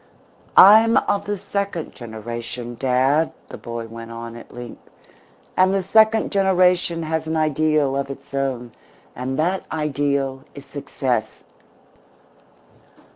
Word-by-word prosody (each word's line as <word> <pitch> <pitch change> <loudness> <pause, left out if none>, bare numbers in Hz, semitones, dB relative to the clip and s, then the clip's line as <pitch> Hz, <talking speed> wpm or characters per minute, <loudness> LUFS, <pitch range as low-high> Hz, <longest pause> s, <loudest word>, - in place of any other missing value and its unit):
"I'm 220 +4 +8
of 200 0 0
the 205 0 -2
second 200 -3 -4
generation, 120 +1 -7
dad," 135 +4 +2 0.2
the - - -8
boy 115 -1 -6
went 115 0 -9
on, 115 0 -8
at 120 - -12
length, 120 -1 -9 0.7
"and 185 +1 +4
the 195 - 0
second 220 +3 +3
generation 180 -3 +2
has 160 0 -2
an 160 0 -1
ideal 155 -2 +1
of 140 0 -2
its 140 +1 -10
own, 130 -3 -2 0.4
and 130 +2 -4
that 180 +5 0
ideal 140 -3 -1
is 140 -1 -10
Success. 130 -5 -3
145 Hz, 125 wpm, -21 LUFS, 125-180 Hz, 0.7 s, I'm